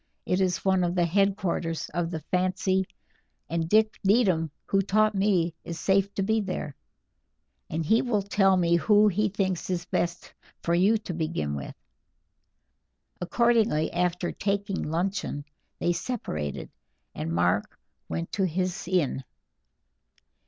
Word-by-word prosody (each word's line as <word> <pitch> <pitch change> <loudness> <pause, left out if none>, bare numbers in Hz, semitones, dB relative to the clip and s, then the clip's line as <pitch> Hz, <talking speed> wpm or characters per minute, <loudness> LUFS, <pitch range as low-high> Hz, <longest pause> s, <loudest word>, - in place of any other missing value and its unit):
It 180 +1 +1
is 185 0 0
one 190 -1 +3
of 175 0 0
the 175 -1 +3
headquarters 190 -3 0
of 175 -1 -1
the 160 -2 -4
fancy, 185 +3 0 0.6
and 165 0 -2
Jack 215 +2 +3
Needham, 190 -6 +3 0.2
who 195 - +2
taught 215 +2 +2
me, 190 -4 +2
is 170 -1 -6
safe 195 +2 +2
to 195 - 0
be 220 +2 +1
there, 185 -7 -4 0.9
and 160 +1 -2
he 220 +8 +4
will 220 -6 0
tell 195 -1 +3
me 170 -1 +3
who 210 +4 +5
he 205 +2 +1
thinks 190 -3 -2
is 175 -1 -2
best 175 0 -2 0.3
for 170 - +1
you 195 +6 +4
to 210 -4 -6
begin 155 - -2
with." 70 -2 -6 1.5
Accordingly, 220 -4 +2
after 180 0 0
taking 200 -1 -2
luncheon, 170 -3 -2 0.3
they 175 - +1
separated, 75 - -4 0.4
and 80 +2 -4
Mark 90 +4 +1 0.3
went 85 +1 -3
to 195 - +1
his 185 +2 -2
inn. 170 -7 0
185 Hz, 140 wpm, -27 LUFS, 165-200 Hz, 1.5 s, who